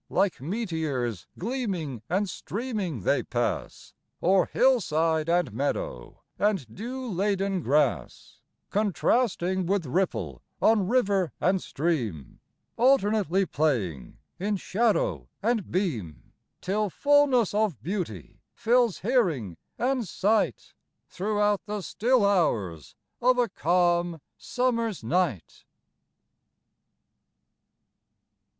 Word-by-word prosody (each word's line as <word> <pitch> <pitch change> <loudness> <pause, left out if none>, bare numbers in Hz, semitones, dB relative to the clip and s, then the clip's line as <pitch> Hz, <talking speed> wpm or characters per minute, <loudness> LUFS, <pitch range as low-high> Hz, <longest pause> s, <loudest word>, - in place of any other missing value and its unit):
Like 195 -9 +1
meteors, 155 - -3
gleaming 185 - -3
and 195 +4 +1
streaming, 190 - -4
they - - +2
pass - - -3 0.3
O'er 185 +1 +4
hillside 165 -10 +2
and 170 -9 +1
meadow, 110 - -3 0.2
and 200 -8 +1
dew 255 +4 -5
laden 195 -1 0
grass, 145 0 0 0.3
Contrasting 190 - +1
with 195 -2 0
ripple 115 - -1 0.2
on 215 -4 +3
river 195 - +1
and 185 0 +2
stream, 120 - -3 0.4
Alternately 210 - +3
playing 110 - -1 0.2
in 205 +3 0
shadow 185 - 0
and 225 -3 0
beam, 125 - -3 0.3
Till 205 +2 0
fullness 280 - +3
of 210 - 0
beauty 170 - -5
fills 235 -3 +2
hearing 175 - +1 0.2
and 250 -3 0
sight 210 +4 0 0.4
Throughout 205 +1 0
the 210 0 -3
still 235 +3 +2
hours 105 - 0 0.3
of 250 +1 +4
a 245 -1 +3
calm 175 -1 +1 0.2
summer's 230 - -1
night. 150 - -1
190 Hz, 95 wpm, -27 LUFS, 155-220 Hz, 0.4 s, O'er